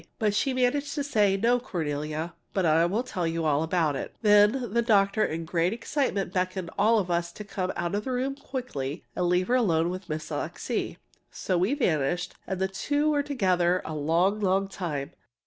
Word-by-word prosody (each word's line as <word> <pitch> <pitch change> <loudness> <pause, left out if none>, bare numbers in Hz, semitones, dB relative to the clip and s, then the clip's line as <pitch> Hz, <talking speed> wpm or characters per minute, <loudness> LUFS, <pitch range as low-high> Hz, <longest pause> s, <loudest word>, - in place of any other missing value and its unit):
But 210 -2 +1
she 240 +6 +1
managed 260 +3 0
to 290 - -1
say, 210 -8 +2
"No, 235 +4 +3
Cornelia, 155 - -3 0.2
but 190 -2 +2
I'll 170 +8 +3
tell 185 -9 -2
you 165 0 -2
all 150 -1 +2
about 160 -3 +1
it." - - -5
Then 210 +2 +4
the 235 - +3
doctor 210 -2 +3
in 165 -2 -2
great 170 +3 +1
excitement 225 -5 -1
beckoned 185 -1 -2
us - - -20
all 215 -1 +4 0.2
to 170 +4 -9
come 190 -2 -3
out 175 +1 -2
of 205 +1 -1
the 260 - -2
room 255 +2 -1
quickly 250 - -5
and 180 - 0
leave 180 +1 +2
her 245 - +1
alone 175 -9 +2
with 185 0 -7
Miss 155 0 -4
Alixe. - - -3 0.3
So 185 - -2
we 185 +10 +2
vanished, 175 - 0
and 190 -1 -3
the 190 - +1
two 290 +10 0
were 295 - +1
there - - +3
together 185 -9 +2
a 160 - -4
long, 165 +7 +1
long 195 -1 +1
time. 155 -7 -4
190 Hz, 195 wpm, -27 LUFS, 170-230 Hz, 0.3 s, Then